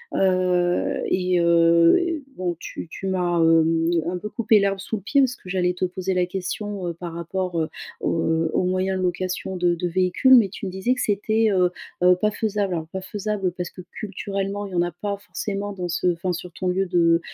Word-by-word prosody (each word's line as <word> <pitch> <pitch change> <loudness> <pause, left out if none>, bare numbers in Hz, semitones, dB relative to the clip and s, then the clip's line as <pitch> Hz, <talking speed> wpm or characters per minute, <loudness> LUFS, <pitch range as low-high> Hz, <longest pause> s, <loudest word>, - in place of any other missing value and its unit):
Heu, 180 -2 +1
et 180 -1 +1
heu, 170 - +4
bon 180 -2 -2
tu - - -7
tu 195 - -6
m'as, 180 -2 0
hem, 165 0 +3 0.2
un 180 - -2
peu 210 +4 -6
coupé 220 -1 +3
l'herbe 195 -1 0
sous 210 - -4
le 205 - -5
pied 280 +9 +1
parce 260 -2 +3
que 190 - -13
j'allais 180 -1 +1
te 180 - -5
poser 185 +1 -1
la 180 -1 +2
question, 190 +1 -4
heu, 170 - -2
par 170 +1 -7
rapport, 170 +1 -3
heu, 160 - 0 0.3
au, 165 - 0
heu, 160 0 +1
au - - +2
moyen 185 +1 0
de 185 - -2
location 185 +1 -2
de 175 -1 +2
de 175 +1 -2
véhicules, 185 +9 +3
mais 230 -5 +6
tu 195 +1 -8
me 190 - -3
disais 240 +6 +1
que 255 - -3
c'était, 215 +2 +1
heu 180 -2 +3 0.3
heu, 180 0 +7
pas 215 - +3
faisable. 205 -3 -1
Alors, 160 -1 -4
pas 190 +3 -6
faisable 200 -1 -2
parce 180 -1 -3
que 185 - -10
culturellement 200 0 -4
il - - -11
y - - -3
en 175 - +3
a 175 - -2
pas 200 +4 -4
forcément 200 0 -4
dans 180 -2 -4
ce 175 +2 0
enfin, 175 +2 -2
sur 175 +1 -6
ton 185 - -4
lieu 185 +2 +1
de 170 -2 +3
185 Hz, 220 wpm, -23 LUFS, 175-200 Hz, 0.3 s, heu